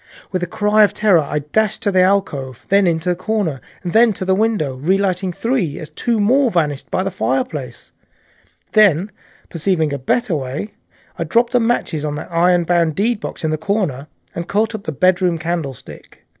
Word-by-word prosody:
With 185 - -1
a 180 - -2
cry 210 +4 +3
of 205 0 +2
terror 210 -5 +4
I 150 0 -3
dashed 220 0 0
at 200 - +1
the 185 - +4
alcove, 180 -10 0
then 200 -1 +4
into 165 +1 0
the 180 - +1
corner 185 -7 -2 0.2
and 175 - -4
then 235 +2 +6
into 195 -4 -3
the 190 - +2
window, 205 -9 0
relighting 185 +4 0
three 220 - -1
as 155 - -8
two 235 -2 -1
more 250 +6 +3
vanished 150 -7 -1
by 185 - 0
the 195 - -2
fireplace, 255 +7 -3 0.7
and - - -42
then, 205 -2 +4 0.4
perceiving 165 -3 0
a 140 - -3
better 190 - 0
way, 140 +9 -4 0.5
I - - 0
dropped 235 +9 +1
matches 225 -10 0
on 150 -1 -2
the 150 - -5
iron 175 +1 +3
bound 170 -2 +1
deedbox 215 -1 -2
in 160 - 0
the 155 - -2
corner, 160 -7 -2 0.3
and 170 +1 -5
caught 220 +3 0
up 215 -2 -7
the - - -2
bedroom 180 +2 +2
candlestick. 160 -6 -6
185 Hz, 185 wpm, -18 LUFS, 160-210 Hz, 0.7 s, then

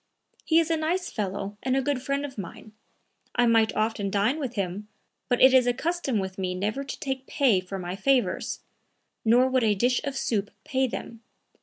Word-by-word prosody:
"He 320 - +3
is 330 0 0
a 325 - +2
nice 345 +4 -1
fellow 205 -1 -4
and 260 0 +1
a - - +2
good 280 -1 -1
friend 280 +2 -1
of 270 -2 -8
mine; 200 +3 -8 0.6
I 245 - +4
might 225 -1 +3
often 215 -2 0
dine 210 +9 +1
with 260 -5 -4
him, 200 +1 -3 0.4
but 245 - +2
it 260 0 +7
is 255 -2 +5
a 245 - +2
custom 335 -7 -1
with 190 -1 -4
me 185 -1 -2
never 215 +8 -2
to 275 - -7
take 265 -1 -4
pay 250 -10 +3
for 185 +1 -6
my 180 0 -4
favors; 255 +5 0 0.6
nor 240 +3 +5
would 260 -1 +1
a 215 -2 +3
dish 245 +5 +2
of 280 -2 -3
soup 210 -5 -1
pay 265 -1 0
them. 230 -1 -7
245 Hz, 200 wpm, -26 LUFS, 205-270 Hz, 0.6 s, it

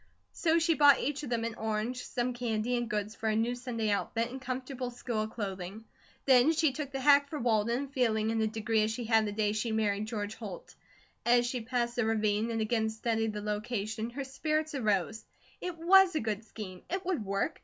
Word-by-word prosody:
So 330 -1 +2
she 335 0 +3
bought 290 -3 +6
each 290 +1 -2
of 290 - -6
them 235 -2 0
an 230 0 -2
orange, 220 +3 -2
some 245 0 -1
candy, 240 0 -1
and 240 -1 -2
goods 210 -1 -2
for 220 0 -2
a 215 - +1
new 230 +2 +1
Sunday 240 -3 -2
outfit 230 +3 -1
and 260 +1 -7
comfortable 255 0 -4
school 240 -3 -3
clothing. 200 -1 -6 0.4
Then 265 +3 +6
she 320 -2 +3
took 280 0 -5
the 270 - -3
hack 285 +1 +5
for 305 - -4
Walden, 235 +2 +1
feeling 225 -5 +1
in 225 0 0
a 220 - +2
degree 220 0 0
as 215 - +1
she 225 +2 -3
had 220 -1 +3
the - - -2
day 210 0 0
she 220 +2 -1
married 215 -1 0
George 210 -2 -3
Holt. 210 -6 -8 0.5
As 240 0 +4
she 245 0 -2
passed 240 +1 -2
the 245 - +2
ravine 215 0 +1
and 225 -1 -1
again 220 0 +1
studied 225 0 -1
the 210 - -4
location 215 +1 -3
her 275 +4 -5
spirits 305 +3 -2
arose. 220 -4 0 0.4
It 360 -2 -4
WAS 370 +1 +6
a - - +2
good 215 -1 -2
scheme. 195 -5 -8
It 375 +1 -3
would 350 - -1
work. 195 0 -2
230 Hz, 210 wpm, -31 LUFS, 215-260 Hz, 0.5 s, bought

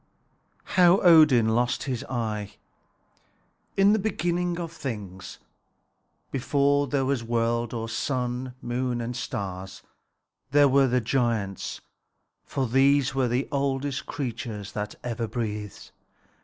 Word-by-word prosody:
HOW 180 0 +6
ODIN 155 - +6
LOST 120 +2 +1
HIS 130 -4 -3
EYE 105 -4 -3 1.2
In 195 +1 +5
the 220 - +2
beginning 175 -3 -1
of 165 -2 -4
things, 105 - -7 0.9
before 140 +2 +2
there 135 0 0
was 135 -2 0
any 115 - -11
world 115 0 0
or 115 -1 -4
sun, 125 +2 -2
moon, 120 0 -1
and 120 +1 -4
stars, 95 -5 -5 0.7
there 145 +1 +5
were 135 0 +4
the 125 0 +1
giants; 115 -5 -1 0.6
for 135 -2 -2
these 135 +3 +3
were 135 -2 +1
the 125 +3 0
oldest 140 0 -1
creatures 115 -6 -5
that 105 0 -4
ever 115 -1 -3
breathed. 105 -3 -5
125 Hz, 120 wpm, -26 LUFS, 115-140 Hz, 1.2 s, HOW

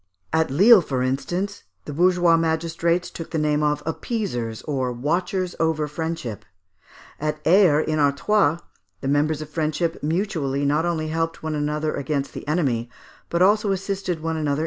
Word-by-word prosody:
At 160 0 +2
Lisle, 200 - +7
for 130 -5 -2
instance, 175 +10 -2 0.2
the 145 - -6
bourgeois 175 +1 +4
magistrates 165 +1 0
took 165 - -7
the 165 - -2
name 150 -1 +1
of 150 -1 0
appeasers, 160 - -3
or 130 -4 -1
watchers 175 +8 -1
over 160 -2 +1
friendship. 160 -7 -4 0.8
At 150 0 -2
Aire, 170 -3 +5
in 155 0 -1
Artois, 150 +4 +2 0.4
the 135 - -3
members 150 +2 +1
of 155 - -13
friendship 160 +2 -1
mutually, 155 -4 -1
not 150 +4 +2
only 160 -2 -1
helped 165 0 -2
one 160 -1 -2
another 150 +1 -1
against 140 0 -2
the - - -8
enemy, 130 -8 0 0.4
but 170 +1 +2
also 205 +1 +3
assisted 190 -3 -2
one 160 0 -2
another - - -2
in 150 -2 0
distress. - - -2
160 Hz, 165 wpm, -23 LUFS, 145-175 Hz, 0.8 s, Lisle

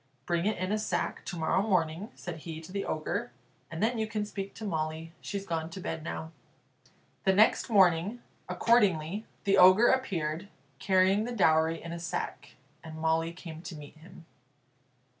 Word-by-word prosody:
"Bring 170 +2 0
it 215 - 0
in 185 +2 -2
a 215 - +1
sack 215 - -2
to 180 - -5
morrow 165 +3 +2
morning," 185 -1 0
said 175 -2 -7
he 160 0 -7
to 165 - -11
the 200 0 -3
Ogre, 205 +9 -2 0.4
"and 165 +4 -3
then 230 +1 +1
you 220 - 0
can 215 -1 -2
speak 200 -1 -6
to 220 - -7
Molly; 160 -2 -3
she's 200 -1 -4
gone 165 -3 -2
to 170 - -8
bed 160 -3 -4
now." 160 0 -5 0.9
The 190 - +4
next 215 +5 +4
morning, 190 +1 +4 0.3
accordingly, 205 -4 +2 0.2
the 195 - +3
Ogre 185 +6 +8
appeared, 175 -9 -1 0.3
carrying 190 +2 +3
the 245 - -4
dowry 160 -4 +3
in 170 - -8
a 170 - -5
sack, 170 - -5 0.3
and 160 -1 -8
Molly 160 +1 +1
came 165 -2 -9
to 175 - -8
meet 150 0 -11
him. 170 +1 -15
180 Hz, 175 wpm, -30 LUFS, 160-205 Hz, 0.9 s, Ogre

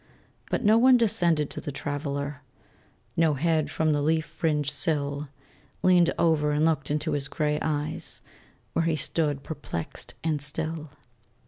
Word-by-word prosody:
But - - -1
no 215 +2 +6
one 255 +1 +7
descended 170 -10 +2
to - - -5
the 145 - -5
Traveler; 145 0 -3 0.7
No 160 -3 +3
head 155 0 +1
from 155 0 +1
the 145 - +1
leaf 160 +1 +2
fringed 150 -2 0
sill 145 +1 -1 0.5
Leaned 175 -2 +5
over 155 -3 +3
and 150 +1 +2
looked 150 -4 +1
into 150 +2 0
his 145 -2 -1
gray 150 +1 0
eyes, 150 0 -3 0.5
Where 165 - +1
he 165 -1 +2
stood 150 -3 -1
perplexed 150 - -6
and 155 -3 0
still. 155 +1 -3
150 Hz, 145 wpm, -27 LUFS, 145-160 Hz, 0.7 s, one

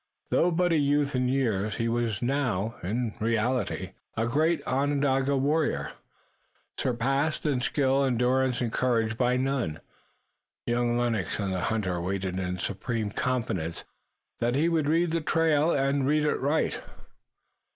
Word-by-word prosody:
Though 175 - +3
but 175 +1 +1
a 165 - +3
youth 145 0 +1
in 125 0 +1
years 110 -6 0
he 115 - -1
was 115 -2 -1
now, 120 -5 0
in 110 +4 -2
reality, 115 -3 -1 0.3
a 115 - +1
great 155 +8 +1
Onondaga 140 0 +1
warrior, 150 +4 0 0.8
surpassed 135 +6 0
in 140 -4 +1
skill, 135 +1 +1
endurance 130 0 +1
and 115 -2 -2
courage 115 -3 +1
by 125 +1 +2
none. 130 - -1 0.9
Young 120 0 +1
Lennox 115 -7 -1
and 100 -2 -1
the 95 - -1
hunter 95 -4 -1
waited 95 0 -2
in 90 -1 -2
supreme 105 +3 -3
confidence 100 -11 -2 0.6
that 120 +1 +1
he 155 +4 +2
would 160 -3 +1
read 165 +1 +2
the 165 0 0
trail 160 -1 +2
and 140 -2 +1
read 150 +1 +2
it 150 - +1
right. 145 +4 0
125 Hz, 140 wpm, -27 LUFS, 110-145 Hz, 0.9 s, Though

